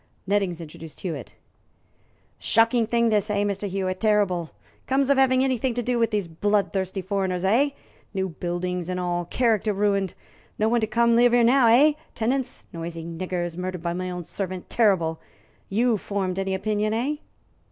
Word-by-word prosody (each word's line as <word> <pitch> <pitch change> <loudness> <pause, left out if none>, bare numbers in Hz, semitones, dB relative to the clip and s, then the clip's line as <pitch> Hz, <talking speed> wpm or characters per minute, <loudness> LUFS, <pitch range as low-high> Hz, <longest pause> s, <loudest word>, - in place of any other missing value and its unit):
Nettings 195 -3 0
introduced 160 -1 -10
Hewitt. 155 - -5 1.1
"Shocking 230 0 +3
thing 235 0 +2
this, 210 -1 +1
eh, 205 -1 +1
Mr. 200 0 -2
Hewitt? 185 -1 -2
Terrible! 200 -6 +1 0.4
Comes 270 +1 +2
of 275 - +4
having 260 -1 +4
anything 255 -2 0
to 245 - -1
do 245 0 0
with 230 -2 +3
these 205 -5 -1
blood 205 +5 0
thirsty 190 0 -2
foreigners, 190 -1 -1
eh? 245 +9 +4 0.4
New 190 -2 -2
buildings 175 +1 -3
and 180 0 -2
all 175 -1 -1
character 220 +1 +1
ruined. 200 -2 0 0.4
No 215 - +2
one 235 +1 +2
come 235 +2 +2
to - - +4
live 240 0 +5
here 240 -1 +5
now, 245 +1 +5
eh? 265 +7 +6 0.2
Tenants 250 +3 -2
noisy 165 0 -6
niggers 175 0 -3
murdered 180 -1 -4
by 170 -1 -1
my 185 +1 -3
own 180 -1 -5
servants 185 +1 -5
terrible! 180 -8 +2 0.5
You 230 +3 +2
formed 195 -2 -2
any 195 0 -1
opinion, 215 +2 0
eh?" 275 +6 -1
200 Hz, 170 wpm, -25 LUFS, 180-230 Hz, 1.1 s, eh